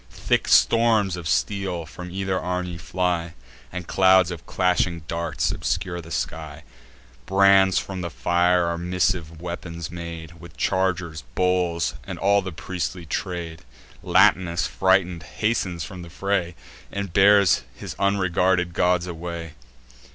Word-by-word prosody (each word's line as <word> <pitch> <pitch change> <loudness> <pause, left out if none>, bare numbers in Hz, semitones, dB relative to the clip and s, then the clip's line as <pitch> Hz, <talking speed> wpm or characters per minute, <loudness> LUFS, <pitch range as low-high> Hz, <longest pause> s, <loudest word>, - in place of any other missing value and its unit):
Thick 65 - 0
storms 110 -5 +4
of 85 -2 -6
steel 90 +7 -1
from 90 +2 -9
either 95 0 -2
army 90 -1 -3
fly, 85 -1 -2 0.4
And 90 -1 -5
clouds 95 -1 +4
of 85 -1 -8
clashing 90 -2 +1
darts 85 0 -1
obscure 85 -2 -2
the 80 - -13
sky; 80 -2 -4 0.6
Brands 95 -1 +5
from 95 -2 -3
the 85 - -3
fire 90 +6 +2
are 85 0 -2
missive 90 -2 -1
weapons 85 -1 -6
made, 85 -1 -8
With 85 -4 -13
chargers, 90 -4 0
bowls, 90 -3 +1
and - - -7
all 100 +1 +3
the 95 -1 -6
priestly 90 +1 -4
trade. 85 0 -4 0.4
Latinus, 85 -1 +3
frighted, 95 -2 +2
hastens 90 -1 -2
from 95 -2 -8
the 85 - -10
fray, 90 -1 -1 0.4
And 100 -3 -4
bears 100 -5 +5
his - - -7
unregarded 95 -2 +1
gods 90 0 +2
away. 85 -2 -6
90 Hz, 130 wpm, -24 LUFS, 85-95 Hz, 0.6 s, Brands